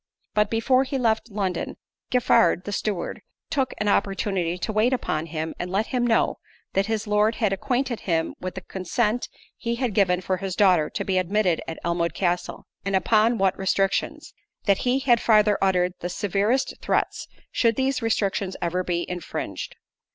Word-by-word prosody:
But 210 0 +2
before 255 +3 +3
he 270 +1 -3
left 225 -2 +1
London, 195 -3 -3 0.3
Giffard, 185 -8 +3
the 205 - -5
steward, 200 -3 -3 0.3
took 270 -2 0
an 210 - -1
opportunity 195 -3 0
to 215 +4 -3
wait 220 +5 +3
upon 160 -10 -1
him, 160 0 -4
and 175 - -3
let 200 +4 +1
him 245 -1 +2
know, 225 - +2 0.3
that 195 +1 +1
his 220 -1 -1
Lord 210 +1 +2
had 210 -5 +1
acquainted 245 +3 -1
him 165 -3 -1
with 185 0 -5
the 190 - -5
consent 210 +6 -1 0.3
he 235 0 -2
had 240 -3 -1
given 180 -3 +3
for 185 0 -1
his 190 0 -4
daughter 180 -7 +4
to - - -4
be 185 -1 +2
admitted 185 -1 +1
at 165 - -5
Elmwood 170 0 0
Castle, 175 -1 -1 0.2
and 195 0 -1
upon 220 +4 +3
what 195 -2 +2
restrictions: 195 +11 0 0.3
that 200 -2 +3
he 255 - +3
had 240 -3 +3
farther 210 -2 +4
uttered 180 -2 +2
the 175 - -4
severest 205 +8 0
threats, - - -1 0.2
should 230 -2 +2
these 265 +1 0
restrictions 200 -4 0
ever 180 +1 -1
be 175 -1 -2
infringed. 180 -2 -5
200 Hz, 175 wpm, -24 LUFS, 180-230 Hz, 0.3 s, daughter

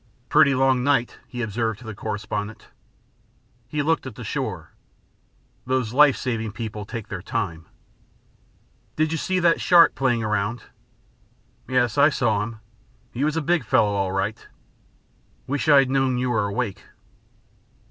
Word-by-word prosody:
"Pretty 140 - +5
long 130 -1 +2
night," 135 -3 +1
he 125 -1 -5
observed 110 0 -2
to 120 - -14
the 110 - -6
correspondent. 105 0 -5 1.0
He 145 +4 -2
looked 165 0 0
at - - -9
the - - -8
shore. - - -4 1.0
"Those 130 -3 -1
life 145 0 +5
saving 115 -4 -3
people 110 -2 -6
take 115 -3 -6
their 95 -3 -5
time." 90 -6 -4 1.3
"Did 155 0 +1
you 165 - -1
see 185 +3 -1
that 170 -2 +3
shark 170 -2 +6
playing 120 -4 0
around?" 110 +2 -1 1.0
"Yes, 125 0 +1
I 145 +2 +7
saw 110 -8 0
him. 110 +1 -6 0.5
He 125 - -3
was 155 +1 0
a 165 - -1
big 170 0 +1
fellow, 105 -2 +2
all 100 -2 -1
right." 95 +3 -3 1.0
"Wish 145 +3 -2
I 145 - +8
had 135 -1 +4
known 135 -2 +1
you 125 0 -1
were 110 -3 +1
awake." 100 -2 -3
120 Hz, 150 wpm, -23 LUFS, 105-135 Hz, 1.3 s, I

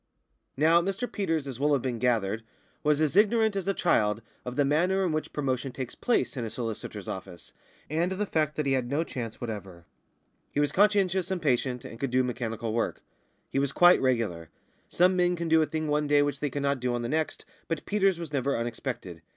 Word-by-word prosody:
Now, 165 +4 +5
Mr 195 +6 -2
Peters, 165 -10 -1
as 130 -3 -6
will 145 +1 +3
have 140 - +2
been 125 -3 -2
gathered, 115 -3 +1 0.4
was 150 -1 +2
as 155 0 +1
ignorant 220 +1 +4
as 195 -1 -2
a 195 - +2
child 105 - +2 0.2
of 125 0 -5
the 145 - +3
manner 180 +7 +2
in 175 - 0
which 155 0 -2
promotion 135 -2 -2
takes 130 -1 -6
place 245 -9 0
in 125 - -3
a 115 - -3
solicitor's 115 -1 -5
office, 85 - -7 0.3
and 165 +4 0
of 190 - -3
the 210 - 0
fact 155 -5 0
that 150 - -1
he 140 - +1
had 130 -2 0
no 145 +4 +1
chance 120 -8 -6
whatever. 95 -7 -7 0.6
He - - -2
was 145 0 +2
conscientious 190 -3 +3
and 190 -1 -1
patient, 125 -4 0
and 115 - -9
could 135 - -1
do 130 +1 +2
mechanical 115 -3 -3
work; 115 - -1 0.5
he 135 - +1
was 140 -1 +1
quite 175 +4 +6
regular. 110 - 0 0.4
Some 180 +2 +3
men 180 0 +2
can 170 -1 -3
do 160 0 +5
a 155 - +1
thing 155 -1 -2
one 150 0 +1
day 145 0 +4
which 145 0 -2
they 145 - -1
cannot 140 0 -1
do 125 0 -1
on 120 - -2
the - - -2
next, 155 +2 -2 0.2
but 165 -3 -3
Peters 195 -3 +2
was 165 -3 -7
never 140 -1 0
unexpected. 115 - -4
145 Hz, 215 wpm, -28 LUFS, 120-170 Hz, 0.6 s, quite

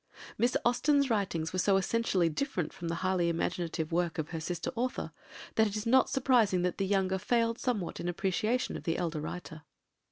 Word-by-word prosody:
Miss 240 +2 +2
Austen's 280 +2 +3
writings 180 -7 -1
were 185 - -1
so 195 +1 +4
essentially 195 -3 +1
different 170 - -2
from 170 - -6
the 165 - -1
highly 185 -2 +2
imaginative 165 -1 -2
work 170 0 0
of 155 -2 -3
her 165 - -4
sister 170 +1 -3
author, 245 +2 -2 0.4
that 220 0 +4
it 205 - -5
is 210 - -4
not 260 +3 +4
surprising 235 -9 +3
that 180 +1 -1
the 195 - 0
younger 190 -1 +1
failed 230 +2 +1
somewhat 215 -8 -2
in 175 - -2
appreciation 195 +7 0
of - - -6
the 165 -2 0
elder 165 -3 -2
writer. 155 0 -7
190 Hz, 190 wpm, -31 LUFS, 170-230 Hz, 0.4 s, so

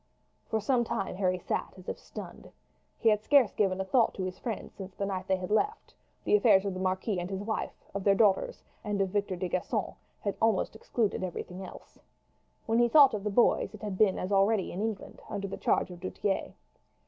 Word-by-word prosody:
For 220 - +1
some 240 +3 +2
time 195 -4 -3
Harry 185 -2 +1
sat 180 - -3
as 185 - -14
if - - -4
stunned. - - -10 0.5
He 230 - +3
had 210 -1 +2
scarce 265 -2 +4
given 190 -2 +1
a 190 - -1
thought 230 +4 +2
to 190 - -3
his 185 0 -5
friends 230 -4 -5
since 190 -1 -9
that 200 - -2
night 190 -1 -3
they 190 - +3
had 185 +1 -5
left, 420 - 0 0.3
the - - +3
affairs 210 - +5
of 195 - -1
the 185 - -5
marquis 185 +1 -1
and 175 +1 -4
his 195 0 -4
wife, 220 +1 -4
of 200 0 -3
their 200 0 +4
daughters, 215 - +2 0.2
and 205 -2 -2
of 195 -1 +1
Victor 200 -1 -1
de 180 +1 -3
Gisons, 180 +1 -2 0.5
almost 220 -1 +2
excluding 220 -3 -1
everything 180 +1 -5
else. 185 - -12 0.7
When 225 0 +2
he 240 0 +4
thought 275 -1 +7
of 205 -2 -3
the 210 - 0
boys 220 0 +2
it 215 - -13
had 200 -3 -4
been 200 -3 +4
as 185 - -3
already 200 0 +3
in 185 - -4
England, 220 -2 -4
under 200 0 -3
the 195 - -5
charge - - +1
of 175 - -9
du 185 +1 -4
Tillet. 195 -2 -2
200 Hz, 220 wpm, -29 LUFS, 185-220 Hz, 0.7 s, thought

